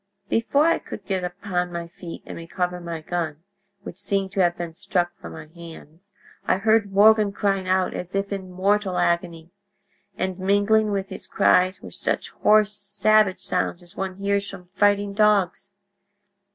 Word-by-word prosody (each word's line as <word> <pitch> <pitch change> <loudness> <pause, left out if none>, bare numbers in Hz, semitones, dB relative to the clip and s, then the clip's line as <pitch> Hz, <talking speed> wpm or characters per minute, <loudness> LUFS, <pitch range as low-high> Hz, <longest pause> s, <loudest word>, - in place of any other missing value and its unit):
"Before 280 +6 +2
I 335 0 +3
could 195 - -9
get 190 -1 -2
upon 180 0 -3
my 170 -1 -5
feet 170 0 -10
and - - -8
recover 180 +2 -3
my 170 -2 -6
gun, 160 -2 -4 0.4
which 180 - -9
seemed 195 -1 -1
to 195 - -4
have 175 -2 +3
been 170 -2 -5
struck 175 -2 -1
from 85 - -9
my - - -9
hands, 165 +3 -14 0.3
I - - +2
heard 215 0 +2
Morgan 210 +1 +5
crying 195 -2 -1
out 185 0 +1
as 180 +2 -6
if 195 +1 -1
in 190 -2 -6
mortal 195 +1 +1
agony, 170 -1 -1 0.7
and 185 0 -2
mingling 205 +3 +3
with 195 -1 -2
his 190 - -8
cries 185 +1 +3
were - - -9
such - - -2
hoarse 210 0 +3
savage 205 -1 +2
sounds 180 0 -2
as 175 - -10
one 190 -1 -4
hears 200 +1 -1
from 180 -2 -11
fighting 205 0 +2
dogs. 200 -2 +2
190 Hz, 165 wpm, -23 LUFS, 175-205 Hz, 0.7 s, Morgan